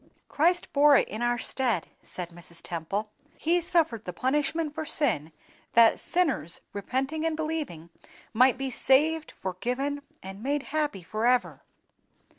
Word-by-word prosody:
"Christ 350 +4 +1
bore 285 0 +6
it - - +2
in 215 - -5
our 240 0 +1
STEAD," 240 -7 0 0.2
said 180 -2 -7
Mrs. 170 -1 -11
Temple; 195 +6 -3 0.3
"He 345 +2 +2
suffered 320 -10 +1
the 180 - -4
punishment 295 - 0
for 315 - -4
sin, 240 - 0 0.4
that 230 -1 +6
sinners, 270 - 0
repenting 265 +9 -2
and 325 -1 0
believing, 300 - -4 0.4
might 255 +3 +5
be 270 0 -3
saved, 305 +6 +3
forgiven, 250 +10 -2 0.2
and 195 +2 -8
made 280 +3 -1
happy 295 - -1
forever." 235 +7 0
260 Hz, 135 wpm, -27 LUFS, 200-305 Hz, 0.4 s, bore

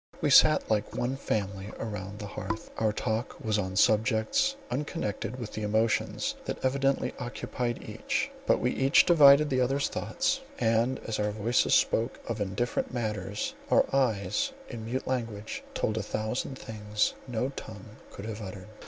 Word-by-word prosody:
We - - +1
sat - - +7
like 105 -1 0
one 125 +2 -1
family 100 -6 -2
round 105 -1 -5
my 105 - -5
hearth. 110 +2 -5
Our 110 -1 +2
talk 110 +2 -2
was 110 -5 0
on 95 -2 -3
subjects, 110 - +3 0.2
unconnected 135 - -3
with 120 -4 -6
the 110 - -4
emotions 110 +1 +1
that - - -3
evidently 135 +1 +1
occupied 120 -1 -4
each; - - -2 0.2
but - - +4
we - - +1
each 135 +1 +5
divined 150 -3 +7
the 130 -2 +1
other's 135 +3 +1
thought, 270 0 -1 0.2
and 115 +3 +2
as 110 -1 -2
our 105 0 +1
voices 110 +3 +2
spoke 115 +3 +1
of 115 -2 -3
indifferent 100 +5 -1
matters, 105 -4 -3 0.2
our - - +5
eyes, 135 - +1 0.2
in 115 -3 -6
mute 130 +4 -3
language, 115 -4 -3
told 110 0 0
a - - -1
thousand 110 +6 -3
things 105 -2 -1
no 125 +1 -1
tongue 110 -5 -10
could 100 - -9
have 110 0 -5
uttered. 95 0 -8
110 Hz, 160 wpm, -29 LUFS, 105-130 Hz, 0.2 s, sat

